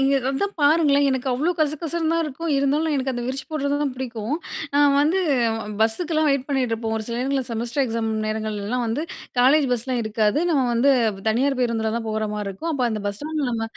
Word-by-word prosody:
இங்கே 275 0 +3
அதான் 390 +10 -1
பாருங்களேன்! 290 -1 +4
எனக்கு 260 0 -2
அவ்வளோ 290 +8 +1
கசகசன்னு 315 +2 0
தான் 335 0 +2
இருக்கும். 315 +3 -4
இருந்தாலும் 295 +3 +1
எனக்கு 265 0 -1
அந்த 240 -1 -3
விரிச்சு 265 +1 -3
போடுறத 285 -2 0
தான் 280 -3 -1
பிடிக்கும். 245 0 -3 0.4
நான் 285 -1 +5
வந்து 315 +6 +2 0.6
பஸ்ஸுக்கெல்லாம் 310 +8 +1
வெயிட் 275 -1 0
பண்ணிட்டு 265 -4 0
இருப்போம். 225 0 -3
ஒரு 220 - -3
சில 235 - -3
நேரங்கள்ல 270 +2 0
செமஸ்டர் 235 +4 -1
எக்ஸாம் 230 -2 -2 0.2
நேரங்கள்லலாம் 215 +2 -2
வந்து, 230 +7 -1 0.4
காலேஜ் 275 +4 +5
பஸ்லாம் 245 +1 -1
இருக்காது. 215 +2 +1
நம்ம 285 -5 +3
வந்து 240 +4 +4 0.4
தனியார் 260 +5 +1
பேருந்தில 225 -3 0
தான் 230 -1 -4
போறமாரி 210 -1 -2
இருக்கும். 260 - -4
அப்ப 275 -4 -1
அந்த 215 -2 -3
பஸ் 200 0 -3
ஸ்டாண்ட்ல 305 -1 -2
நம்ம 230 -2 -2
265 Hz, 185 wpm, -23 LUFS, 225-290 Hz, 0.6 s, நான்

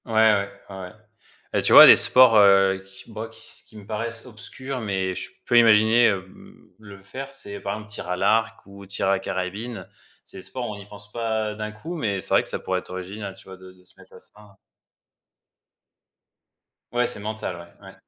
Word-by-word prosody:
Ouais, 115 - -8
ouais, 110 -3 +3 0.2
ouais, 95 - -9
ouais 90 0 -9 0.6
et - - +1
tu - - +1
vois? - - +12
Des - - +9
sports, 125 -3 +7
heu, 95 -1 +5
qui 95 +4 -15
moi 110 +1 -7
qui 110 0 -17
s - - -11
qui 110 - -15
me 105 - -12
paraissent 115 +2 -5
obscurs 130 +3 -8
mais 95 -3 -2
je - - -6 0.2
peux 120 - +4
imaginer, 110 +1 +5
hem, 95 -2 -6
le 100 -2 -14
faire 135 +7 -8
c'est, 100 -7 -9
par 100 0 -4
exemple, 105 0 -11
tir 95 -4 -7
à 90 - -1
l'arc 110 +4 0
ou 100 0 -14
tir 100 0 -2
à - - +3
la 100 - +1
carabine. 100 +6 -6 0.4
C'est - - -12
des 95 - -10
sports 125 -2 -6
on 105 - -7
n'y 100 -1 -13
pense 105 0 -13
pas 110 -2 -3
d'un 110 0 -6
coup 155 +12 -8
mais 105 - -2
c'est - - -3
vrai - - +5
que - - -6
ça - - -3
pourrait 95 0 -2
être - - -15
original 95 +2 -7
tu - - -17
vois? 95 0 -12
De 95 0 -15
de 90 0 -24
se 90 - -20
mettre - - -19
à - - -13
ça. 105 -2 -18 2.4
Ouais, 120 0 +1
c'est 125 - -5
mental, 110 -3 -5
ouais. 85 +3 -15
Ouais. 95 - -12
105 Hz, 220 wpm, -23 LUFS, 95-115 Hz, 2.4 s, vois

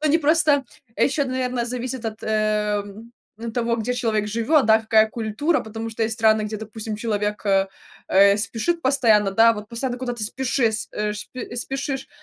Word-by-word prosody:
Они 310 +1 +3
просто 305 -2 +3 0.3
ещё, 280 +1 +1
наверно, 255 -2 -2
зависит 250 0 -4
от, 220 0 -6
эм, 210 0 -1 0.4
того, 235 -1 0
где 235 +2 -2
человек 220 -4 0
живёт, 235 +6 +2
да, 220 0 +6
какая 220 0 +4
культура. 230 +9 -1
Потому 225 +1 -6
что 225 +1 -3
есть 225 +1 -1
страны, 220 -1 +4
где, 215 +1 -4
допустим, 215 0 -6
человек, 210 -1 -2
э 195 -1 +3 0.5
э, 200 +1 +6
спешит 285 +11 -1
постоянно, 230 -7 +3
да, 225 +3 +5
вот 210 -1 -8
постоянно 245 +2 -3
куда-то 245 -3 -3
спешис 235 -2 -1
э, 210 0 -2
шп 210 - -8
э, 250 - -6
спешишь, 270 +2 -3
225 Hz, 165 wpm, -22 LUFS, 215-255 Hz, 0.5 s, да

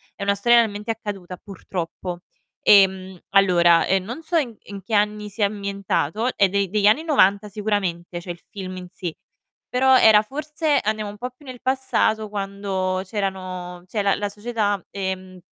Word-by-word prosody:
è - - -6
una 200 0 +2
storia 235 +4 +5
realmente 210 0 -1
accaduta, 195 -5 -6
purtroppo. 180 -2 -6 0.4
Ehm, 190 -2 +4
allora, 175 -4 +5
ehm, 190 -1 +2
non 255 +9 -7
so 335 +1 0
in 240 -8 -1
in 200 -1 -9
che 220 - -7
anni 210 0 0
sia 205 0 +1
ambientato, 200 - -2
è 195 -2 +4
de 200 -1 0
degli 205 0 +2
anni 265 +10 +4
90 210 - +3
sicuramente 190 -5 -2
cioè, 175 0 -6
il 170 - -10
film 185 -2 -7
in 180 -1 -8
sé, 180 -3 -6 0.5
però 260 +1 +4
era 215 -2 +7
forse 300 +4 -1
andiamo 215 -1 -2
un 205 - -11
po' 250 +3 -4
più 265 +4 -21
nel 255 -2 -9
passato 255 -4 +1
quando 195 -2 -2
c'erano 185 -3 -4
cioè 205 +2 -2
la 200 -1 +3
la 205 - -2
società, 210 -2 -2
ehm 190 -1 -5
200 Hz, 170 wpm, -22 LUFS, 185-220 Hz, 0.5 s, era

